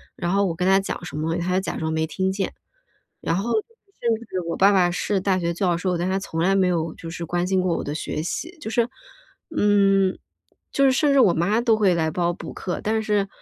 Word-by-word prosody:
然 175 -1 -2
后 200 +1 +3
我 170 -3 -1
跟 180 +2 0
他 195 0 +5
讲 195 - -5
什 175 - -7
么， 160 +2 -1
他 175 +1 -1
就 - - +3
假 - - -4
装 160 0 -2
没 160 0 0
听 190 +4 -1
见。 195 0 -2 0.7
然 165 - 0
后 205 +6 -1
甚 235 - -2
至 185 - -3
我 165 - -2
爸 195 +1 +5
爸 185 -3 +4
是 195 +3 0
大 190 0 +1
学 170 -1 -1
教 175 0 +1
授， 180 0 -1
但 175 +2 -1
是 190 - 0
他 190 - +1
从 165 -4 -5
来 190 +3 +3
没 190 -1 +3
有 165 -2 -1
就 165 - -8
是 170 0 -5
关 175 +2 -1
心 190 0 +2
过 180 -2 0
我 - - -3
的 145 - -4
学 155 - -3
习。 330 - -4
就 290 - -6
是， 235 +1 +1 0.7
嗯， 195 -2 +3 0.5
就 275 - +3
是 265 - +5
甚 280 +2 +2
至 275 - +5
我 210 -9 +5
妈 200 +7 +1
都 230 -2 +3
会 205 -4 +3
来 160 -1 +1
帮 175 +1 0
我 175 - 0
补 - - -8
课。 180 - -4
但 220 +1 0
是 210 -2 +1
190 Hz, 275 characters per minute, -23 LUFS, 170-205 Hz, 0.7 s, 他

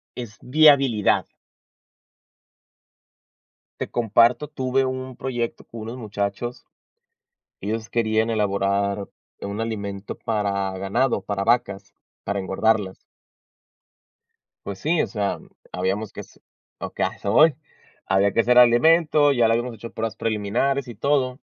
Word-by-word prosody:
es 115 -4 -8
viabilidad. 135 -6 +4 2.5
Te - - -4
comparto. 120 +4 +3
Tuve 130 0 0
un 130 -1 -5
proyecto 120 -3 -4
con 115 -1 -9
unos 115 +3 -6
muchachos, 105 +2 -4 0.9
y 100 - -4
ellos 110 0 -4
querían 110 -1 +1
elaborar 100 -1 0 0.3
un 100 +2 -5
alimento 100 -3 -4
para 100 -3 -1
ganado, 120 +7 0
para 100 -1 -3
vacas, 100 -4 0 0.3
para 100 - -2
engordarlas. 95 0 0 1.7
Pues 100 -1 -6
sí, 160 +1 +1
o - - +1
sea, 105 -3 -2
mm, - - -17 0.2
habíamos 95 +3 -2
que - - -8
hace - - -14 0.4
okey, - - -3
a - - 0
eso 100 - -4
voy. 155 -1 +6 0.5
Había 95 +1 +2
que 115 - +3
hacer 125 +1 +4
alimento, 145 +4 +5
ya 120 -4 +3
lo 115 - +3
habíamos 120 +1 -2
hecho 115 +1 -10
pruebas 110 0 -4
preliminares 115 +5 -1
y 120 - -7
todo, 130 +2 0
115 Hz, 130 wpm, -23 LUFS, 100-125 Hz, 2.5 s, voy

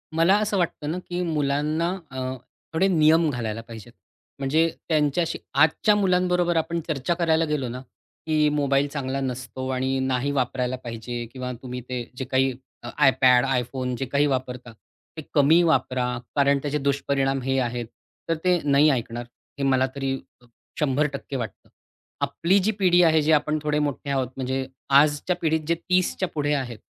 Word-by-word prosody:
मला 170 +4 +4
असं 210 -1 0
वाटतं 165 -4 -1
ना, 175 - -3
की 180 0 -5
मुलांना 155 +1 0 0.2
अ, 130 - -5 0.5
थोडे 185 +4 +3
नियम 160 -2 +4
घालायला 115 -4 -3
पाहिजेत. 115 +1 -11 0.5
म्हणजे 155 +5 +2 0.2
त्यांच्याशी 155 +1 +1
आजच्या 160 +9 +4
मुलांबरोबर 180 -3 +2
आपण 170 +1 -1
चर्चा 150 +1 -1
करायला 165 -2 +2
गेलो 150 -4 -2
ना, 125 +2 -6 0.4
की 155 -1 +2
मोबाईल 145 -1 +1
चांगला 135 -2 -3
नसतो 130 0 -4
आणि 130 +1 0
नाही 130 +1 0
वापरायला 130 -1 -1
पाहिजे 120 +1 -5
किंवा 125 -1 -5
तुम्ही 125 -1 -6
ते 125 -1 -3
जे 130 - -3
काही 130 +1 +2 0.3
अ, - - -6 0.2
iPad, 125 -1 +5 0.2
iPhone, 125 +1 -4
जे 135 - -2
काही 140 +3 +1
वापरता 125 -3 -3 0.5
ते 160 - -4
कमी 155 +4 +5
वापरा 130 -6 +1 0.3
कारण 140 -1 +3
त्याचे 145 +1 -1
दुष्परिणाम 135 -1 0
हे 135 0 0
आहेत. 120 -1 -2 0.4
तर 165 - +2
ते 180 -1 +3
नाही 145 +1 +4
ऐकणार, 120 -3 -2 0.3
हे - - -1
मला 130 -1 +3
तरी 135 -1 -1 0.3
अ, - - -21 0.3
100% 140 -1 -1
वाटतं. 120 -4 -6 0.5
आपली 185 +4 +2
जी 220 - +3
पिढी 180 -2 +5
आहे 160 -2 +4
जी 155 - +1
आपण 150 0 +2
थोडे 150 0 +1
मोठे 145 -1 -2
आहोत 130 -3 0
म्हणजे 130 0 -2 0.4
आजच्या 150 +4 0
पिढीत 160 -1 +2
जे 170 - +2
30 180 +2 0
च्या 185 - 0
पुढे 145 -1 0
आहेत 125 -6 -3
140 Hz, 165 wpm, -24 LUFS, 130-160 Hz, 0.5 s, iPad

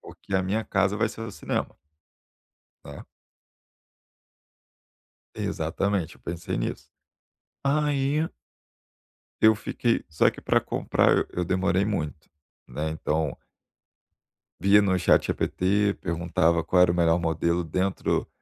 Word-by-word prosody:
porque 100 - -9
a 95 - +3
minha 105 +4 -1
casa 100 0 +1
vai 115 +2 +1
ser 110 - -10
o 115 - -5
cinema" - - -3 1.1
né. - - -9 2.3
Exatamente, 100 -5 -2
eu - - -23
pensei 85 -1 -4
nisso. - - -4 0.7
Aí 145 +1 +1 1.1
eu 110 0 +6
fiquei 115 +2 -1
só 75 - +3
que - - -12
para - - +2
comprar - - +1
eu 90 -1 -2
demorei 95 +1 +1
muito, 75 -7 -4 0.4
né, 80 +1 -3
então 80 -2 -2 1.2
via 100 +1 +5
no 95 -2 +2
ChatGPT, 100 +3 +2
perguntava 85 -1 +1
qual 90 +2 +3
era 90 - +4
o 85 - -2
melhor 85 0 +3
modelo 85 +1 0
dentro 95 +4 -1
95 Hz, 115 wpm, -26 LUFS, 85-105 Hz, 2.3 s, eu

